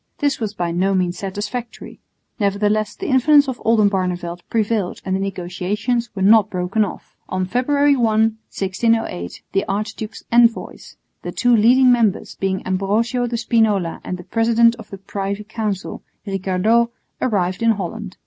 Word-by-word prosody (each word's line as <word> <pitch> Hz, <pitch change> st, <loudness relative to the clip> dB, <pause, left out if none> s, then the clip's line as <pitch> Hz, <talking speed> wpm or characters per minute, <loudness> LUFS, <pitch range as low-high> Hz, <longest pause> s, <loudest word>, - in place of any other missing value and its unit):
This 285 Hz, -1 st, 0 dB
was 215 Hz, -3 st, -3 dB
by 175 Hz, -3 st, -2 dB
no 190 Hz, +3 st, +1 dB
means 180 Hz, -1 st, -1 dB
satisfactory; 210 Hz, +5 st, -6 dB, 0.4 s
nevertheless 210 Hz, +1 st, 0 dB
the 390 Hz, -, -7 dB
influence 285 Hz, 0 st, +4 dB
of 260 Hz, -2 st, -5 dB
Oldenbarneveldt 185 Hz, -5 st, +1 dB
prevailed 215 Hz, -4 st, -1 dB
and 190 Hz, 0 st, 0 dB
the -, -, -1 dB
negotiations 195 Hz, +6 st, -2 dB
were 190 Hz, -, -2 dB
not 210 Hz, 0 st, +5 dB
broken 185 Hz, +4 st, 0 dB
off. 205 Hz, -, -7 dB
On 185 Hz, 0 st, -1 dB
February 280 Hz, +7 st, +2 dB
1, 245 Hz, -, 0 dB, 0.2 s
1608, 220 Hz, -, -1 dB
the 195 Hz, -, +1 dB
archdukes' 215 Hz, +2 st, -4 dB
envoys, 235 Hz, -1 st, +1 dB, 0.2 s
the -, -, -5 dB
two 245 Hz, -1 st, +3 dB
leading 250 Hz, +4 st, +5 dB
members 230 Hz, -5 st, +1 dB
being 190 Hz, -1 st, -2 dB
Ambrosio 215 Hz, +6 st, 0 dB
de 235 Hz, 0 st, -2 dB
Spinola 220 Hz, -7 st, +1 dB
and 180 Hz, -, -4 dB
the 180 Hz, -, -10 dB
president 230 Hz, +3 st, +3 dB
of 225 Hz, -, -12 dB
the 195 Hz, -, -8 dB
Privy 200 Hz, +1 st, -4 dB
Council, 210 Hz, -3 st, -4 dB, 0.2 s
Ricardot, 195 Hz, +4 st, +1 dB, 0.3 s
arrived 185 Hz, -6 st, 0 dB
in 230 Hz, -, +3 dB
Holland. 200 Hz, 0 st, -6 dB
210 Hz, 150 wpm, -20 LUFS, 190-230 Hz, 0.4 s, not